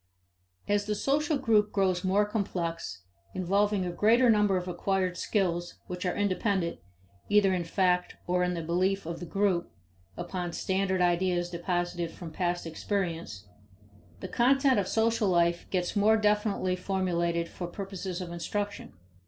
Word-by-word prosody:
As 205 0 +1
the 210 0 -1
social 295 +7 +1
group 220 -6 +2
grows 185 -2 +1
more 195 +2 +3
complex, 175 - -3 0.3
involving 200 +1 +1
a 175 - -2
greater 230 +6 +4
number 210 -3 +3
of 180 0 -4
acquired 185 0 -1
skills 175 -4 -1
which 180 +1 -4
are 205 +3 +1
dependent, 185 -2 -1 0.5
either 205 -2 +4
in 180 -1 0
fact 180 +1 +1
or 180 0 +1
in 180 0 0
the 165 - -4
belief 185 +4 0
of 170 +1 -5
the 175 - -7
group, 190 -1 0 0.5
upon 175 0 -4
standard 190 -1 0
ideas 175 0 +1
deposited 175 -1 -2
from 165 0 -9
past 175 +1 -1
experience, 165 - -3 0.8
the - - -4
content 270 0 +3
of 190 - -1
social 225 0 +1
life 170 -1 +1
gets 180 0 -1
more 215 +2 +4
definitely 210 -3 +1
formulated 175 -3 -1
for 175 - -6
purposes 190 -1 -5
of 175 -1 -6
instruction. 205 +4 -4
185 Hz, 145 wpm, -29 LUFS, 175-205 Hz, 0.8 s, greater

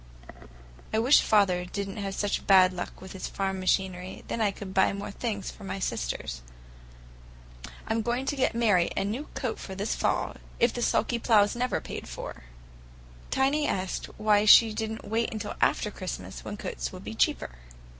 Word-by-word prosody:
I 220 - 0
wish 245 +6 +6
father 190 -4 +3
did 200 +2 -4
n't 195 +2 -7
have 195 -1 -3
such 205 -1 -1
bad 185 -2 +7
luck 175 - -6
with 190 0 -10
his 190 - -5
farm 195 -1 -2
machinery; 185 0 -1
then 230 - -2
I 210 - +3
could 195 -1 -7
buy 190 - +4
more 200 0 -5
things 205 -2 -3
for - - -14
my 195 - -4
sisters. - - -3 1.5
I'm 225 +1 +1
going 240 +3 -1
to 285 - -1
get 260 -4 +1
Mary 205 -7 +3
a - - +2
new 240 +9 -3
coat 250 -5 -3
this 195 +2 -3
fall, - - -1 0.2
if 235 0 +3
the 240 - -4
sulky 235 0 +1
plough's 210 -3 +4
never 250 +1 0
paid - - -7
for!" - - -8 0.8
Tiny 280 +3 +2
asked 185 0 -2
her - - -15
why 210 -1 +3
she 220 +1 +8
did 220 0 -2
n't 220 -2 -7
wait 225 +2 0
until 215 -1 -4
after 210 - +2
Christmas, 130 - -6
when - - -6
coats - - -4
would - - -10
be - - -6
cheaper. - - +1
205 Hz, 185 wpm, -28 LUFS, 190-225 Hz, 1.5 s, she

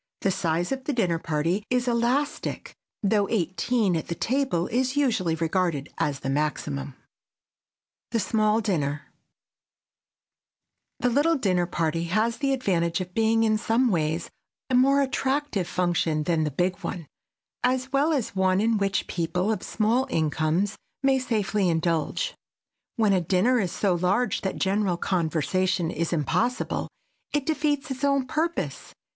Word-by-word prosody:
The 195 - +2
size 175 0 -1
of 265 -1 -3
the 295 - -1
dinner 180 -9 +1
party 165 +6 -1
is 250 0 +1
elastic, 245 +5 -1 0.3
though 205 0 +2
eighteen 195 +1 +1
at 160 - -3
the 170 - -3
table 255 -6 0
is 255 +4 0
usually 225 - +1
regarded 165 -3 -1
as 145 -4 -1
the - - -4
maximum. 140 -2 -2
[Sidenote: - - -45
THE 230 - 0
SMALL 215 +2 +2
DINNER] 150 -8 -1 2.0
The 250 - +3
little 295 +7 +3
dinner 185 - +1
party 165 -1 -1
has 215 +7 +1
the 275 -2 0
advantage 180 -10 0
of 180 -1 -6
being 225 0 +3
in 215 -1 +2
some 235 +3 +2
ways 160 -1 -1 0.4
a - - +1
more 275 +3 +5
attractive 265 - -1
function 175 -4 0
than 160 -1 +1
the - - 0
big 180 +6 0
one, 175 -3 -5 0.6
as 260 +1 0
well 285 +4 +3
as 265 -10 -1
one 190 0 +2
in 220 0 +2
which 195 -1 0
people 180 +4 -1
of 220 - -2
small 230 +5 +1
incomes 160 - 0 0.3
may 270 -1 +4
safely 210 -6 0
indulge. 165 -1 0 0.6
When 215 -3 +3
a 185 - +3
dinner 195 +9 +2
is 185 -5 -1
so 195 -3 +1
large 185 +8 +1
that 190 - -2
general 195 -2 +1
conversation 175 +1 0
is 165 0 -2
impossible, 175 - 0 0.5
it 295 -2 0
defeats 295 -2 0
its 265 +1 -5
own 275 -2 +2
purpose. 320 +5 -3
195 Hz, 150 wpm, -26 LUFS, 170-250 Hz, 2.0 s, more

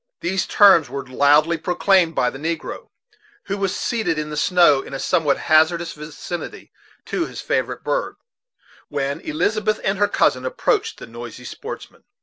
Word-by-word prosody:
These 185 +2 -1
terms 195 -7 +6
were 140 - -5
loudly 145 +5 +3
proclaimed 175 0 +2
by 125 - +1
the 135 - -9
negro, 165 +1 -4 0.6
who 200 - -3
was 195 -2 -1
seated 220 -9 -1
in 150 0 -3
the - - -4
snow, 160 -3 +4
in 135 - -8
a - - -4
somewhat 160 -6 +1
hazardous 165 +2 +2
vicinity 150 +3 -8 0.3
to 340 - -2
his - - -9
favorite - - -2
bird, - - -2 0.7
when 140 0 -2
Elizabeth 215 -8 0
and 195 +1 0
her 205 - +4
cousin - - +1
approached 450 -3 -1
the - - -9
noisy 120 0 -10
sportsmen. - - -9
170 Hz, 155 wpm, -21 LUFS, 150-200 Hz, 0.7 s, terms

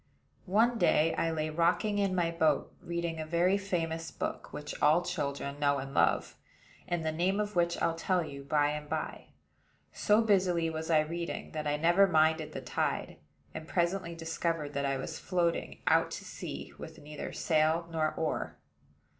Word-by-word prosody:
One 225 +5 +3
day 165 -3 +4
I 165 - 0
lay 155 -1 -2
rocking 175 +6 +2
in 195 -2 +1
my 170 -2 +1
boat, 160 -3 +1
reading 170 -1 -3
a - - -2
very 175 +4 +3
famous 165 -5 -2
book, - - -5
which 150 - -6
all 155 +4 +5
children 145 -5 -3
know 140 -1 +3
and 135 0 -6
love; - - +2 0.5
and 175 -2 -2
the 160 - +1
name 180 +5 +1
of 210 -1 -2
which 170 0 +1
I'll 165 - +2
tell 175 +2 0
you 140 -2 -8
by 145 +1 +2
and 150 0 -5
by. 155 0 -4 0.7
So 210 +2 +3
busily 180 -6 +2
was 160 +1 -5
I 155 -2 +5
reading, 170 +2 -4
that 155 -1 -3
I 145 0 +1
never 175 +5 +5
minded 160 -2 +2
the 135 - -5
tide; 125 -1 -2 0.4
and 160 0 -7
presently 170 0 0
discovered 165 -2 -2
that 140 0 0
I 135 0 0
was 160 +4 -5
floating 175 -2 -1
out - - +4
to - - -11
sea, - - -7
with - - -9
neither 150 0 -7
sail 160 +1 +1
nor 155 -1 0
oar. 160 -1 -2
165 Hz, 175 wpm, -31 LUFS, 155-175 Hz, 0.7 s, all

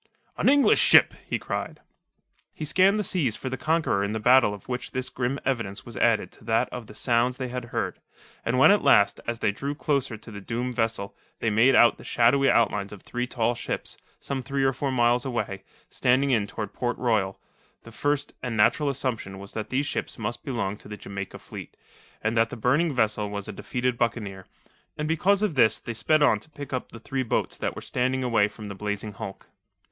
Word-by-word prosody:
"An - - +2
English 285 0 +5
ship!" - - +7 0.2
he - - 0
cried. - - -4 0.8
He 155 - -5
scanned 185 +7 +4
the 210 - 0
seas 155 - +1
for 130 - -5
the 130 - -3
conqueror 155 -9 +1
in 100 +1 -2
the 110 - -2
battle 125 0 +5
of 105 -2 -9
which 125 -1 -4
this 130 0 -2
grim 125 +2 -2
evidence 115 -7 -2
was 120 - -8
added 115 +2 +2
to - - -17
that 115 0 +2
of 120 -3 -7
the 105 - -12
sounds 125 +1 +1
they 130 -1 -4
had 125 -1 -4
heard, 120 - -3 0.4
and 115 +2 0
when 135 - +7
at 205 - +4
last, 100 0 +4
as 115 0 -1
they 105 - +1
drew 140 +7 -4
closer 140 -6 -1
to 115 - -12
the 100 -1 -8
doomed 120 +5 -3
vessel, 115 -4 -2 0.2
they 110 - 0
made 115 +5 +5
out 120 - +5
the - - -11
shadowy 135 +4 +3
outlines 105 -4 +2
of 105 - -11
three 125 0 -3
tall 120 -1 0
ships, 120 - -4 0.2
some 135 -1 -4
three 135 +1 -2
or 135 0 +3
four 135 +2 -2
miles 120 -1 +3
away, 120 -7 -3 0.3
standing 130 +2 +2
in 110 -5 +2
toward 105 +1 -6
Port 120 -1 -2
Royal, 105 -6 0 0.4
the 115 - -12
first 145 +4 -1
and 120 -3 -3
natural 140 +7 +3
assumption 120 -8 -3
was 100 +1 -10
that 110 -1 -4
these 135 +3 0
ships - - -3
must 120 +1 -4
belong 105 -7 -2
to - - -14
the 105 0 -7
Jamaica 100 -1 -7
fleet, - - -10 0.5
and 110 +2 0
that 115 0 +3
the 125 - -7
burning 140 +9 +2
vessel 105 -5 0
was 100 -1 -5
a - - -4
defeated 125 +4 -2
buccaneer, 105 -5 -2 0.5
and 150 - -2
because 190 +6 +2
of 205 -6 +1
this 115 -6 +4
they 120 - -6
sped 155 +7 +2
on 110 -7 +4
to 155 - -13
pick 145 -2 -9
up 130 - -3
the 115 - -10
three 135 +3 -3
boats 120 - -1
that - - -2
were - - -7
standing 130 +1 -1
away 115 -4 +3
from 105 0 -10
the 100 - -6
blazing 105 +1 -4
hulk. 95 0 -8
120 Hz, 215 wpm, -26 LUFS, 105-135 Hz, 0.8 s, ship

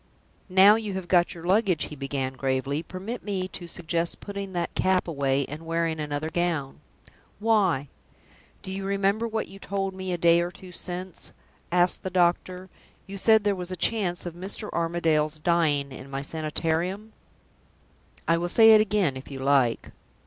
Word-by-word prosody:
"Now 195 +3 +7
you 215 -3 -4
have 190 -2 -5
got 175 -1 +3
your 170 0 -9
luggage," 190 -3 +2
he 150 - -8
began, 135 -1 -3
gravely, 135 +2 -1
"permit 190 +8 -6
me 190 -3 -2
to 175 -2 -8
suggest 170 0 -2
putting 200 -1 -6
that 175 -1 -2
cap 185 -1 +1
away, 140 -3 0
and 150 +5 -8
wearing 165 -1 -1
another 150 +1 -3
gown." 165 -5 -1 0.6
"Why?" 200 -10 +2 0.8
"Do 190 - -6
you 195 +1 -4
remember 200 +3 +1
what 220 -1 -2
you 195 +1 -12
told 195 -1 -3
me 190 0 -5
a 175 - -1
day 170 0 +5
or 175 - -1
two 185 +1 -13
since?" 180 0 -5 0.4
asked 175 0 +3
the 190 - -3
doctor. 180 +1 +1 0.4
"You 195 0 -7
said 220 +1 +5
there 205 -1 +2
was 180 -2 -5
a 185 - -3
chance 185 -4 0
of 175 - -5
Mr. 190 +4 -6
Armadale's 165 -2 +1
dying 155 -4 +1
in 130 +1 -9
my 135 0 -4
Sanitarium?" 165 +7 -2 1.1
"I 165 0 +3
will 175 +1 -2
say 225 +4 +7
it 215 -1 +8
again, 205 -9 +1
if 130 - -9
you 135 - -7
like." 135 -3 +1
175 Hz, 170 wpm, -26 LUFS, 155-195 Hz, 1.1 s, it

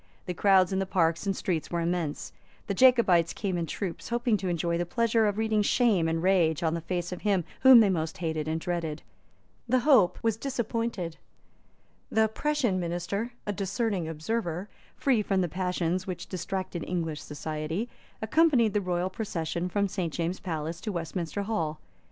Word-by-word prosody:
The 180 - -3
crowds 190 +1 +4
in 190 - +1
the 195 - -1
parks 170 0 +1
and 195 - 0
streets 170 -4 -2
were 170 - -1
immense. 170 -3 -2 0.3
The 200 - -2
Jacobites 195 -8 +5
came 195 -3 -2
in 170 -1 -2
troops, 185 -1 -5
hoping 240 -1 +1
to 190 -1 -4
enjoy 170 -1 0
the - - +1
pleasure 230 +1 +2
of 205 0 -1
reading 220 -1 +2
shame 205 -6 +3
and 165 +1 -1
rage 175 -4 +3
on 160 -1 +1
the 170 - -2
face 175 +1 -3
of 180 - -6
him 200 -4 +2 0.2
whom 260 -3 +9
they 210 - +4
most 160 -3 -2
hated 160 -3 -2
and 160 +1 -1
dreaded. 165 -3 -3 0.7
The 255 +1 +3
hope 245 -10 +5
was 225 -2 +1
disappointed. 230 - -3 0.9
The 220 0 +3
Prussian 245 -5 0
Minister, 175 +7 -3
a 205 - -1
discerning 195 -2 -1
observer, 175 +3 -3 0.3
free 255 -6 +2
from 195 -2 +1
the 180 - +1
passions 180 +1 -1
which 185 - -5
distracted 185 -2 -4
English 165 -4 -2
society, 155 +7 -4 0.4
accompanied 245 -3 +3
the 210 - +1
royal 180 0 -1
procession 175 -4 -3
from 200 +2 +1
St. 185 -4 -3
James's 170 +3 -2
Palace 165 -1 -4
to 215 - -3
Westminster 170 +2 -3
Hall. 165 -8 -2
185 Hz, 175 wpm, -28 LUFS, 170-215 Hz, 0.9 s, whom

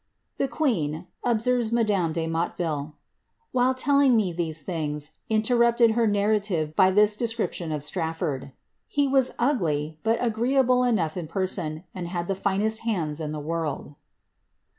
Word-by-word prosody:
' - - -51
^ - - -47
The 275 - 0
queen," 180 - -1 0.2
observes 240 0 +1
madame 210 -8 +1
de 165 0 -2
Motteville, 165 -2 -2
^ 150 - -15 0.6
while 255 +1 +2
telling 280 -1 +4
me 200 -6 +1
these 165 -3 -2
things, 150 -3 -3 0.2
interrupted 235 +1 +3
her 230 0 +2
narrative 200 -6 0
by 190 -1 +5
this 210 +2 +4
description 225 -7 -2
of 150 -2 -2
Straflbrd. 160 -3 -2
^ 135 - -14 0.4
He 285 -1 +1
was 265 -1 +2
ugly, 160 - 0
but 225 +1 +1
agreeable 250 +2 +2
enough 190 -10 0
in 170 -3 -4
person, 175 -4 -2
and 180 -2 -5
had 175 -1 -3
the 195 - 0
finest 200 +3 0
hands 165 -9 -2
in 150 -1 -3
the 155 - -4
world.' 155 -2 -4
190 Hz, 160 wpm, -25 LUFS, 160-235 Hz, 0.6 s, by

